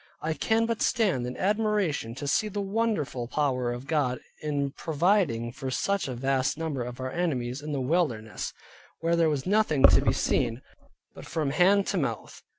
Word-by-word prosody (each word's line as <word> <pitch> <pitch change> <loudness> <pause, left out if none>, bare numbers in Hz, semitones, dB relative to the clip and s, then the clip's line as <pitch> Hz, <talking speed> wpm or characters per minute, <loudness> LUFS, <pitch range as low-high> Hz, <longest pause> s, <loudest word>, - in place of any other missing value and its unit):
I 160 +1 0
can 225 +7 +1
but 230 -1 -2
stand 185 - +1
in 125 - -6
admiration 205 - 0
to 145 +2 -5
see 215 +9 +2
the 205 0 -4
wonderful 200 - -1
power 130 -3 0
of 120 +2 -6
God 140 -5 0 0.2
in 145 -2 -1
providing 160 - +1
for 135 +2 -5
such 200 +8 0
a 130 - -4
vast 135 +2 0
number 160 -5 -3
of 125 +1 -6
our 130 0 -3
enemies 130 -7 -2
in 150 +1 -5
the 140 -2 -1
wilderness, 125 -7 -1 0.5
where 165 +1 +2
there 165 -1 +3
was 145 -3 -2
nothing 195 -8 +2
to - - +7
be - - +2
seen, 115 +2 0 0.5
but - - -11
from 150 -4 -1
hand 190 +6 +4
to - - -1
mouth. - - -3
150 Hz, 180 wpm, -27 LUFS, 130-190 Hz, 0.5 s, to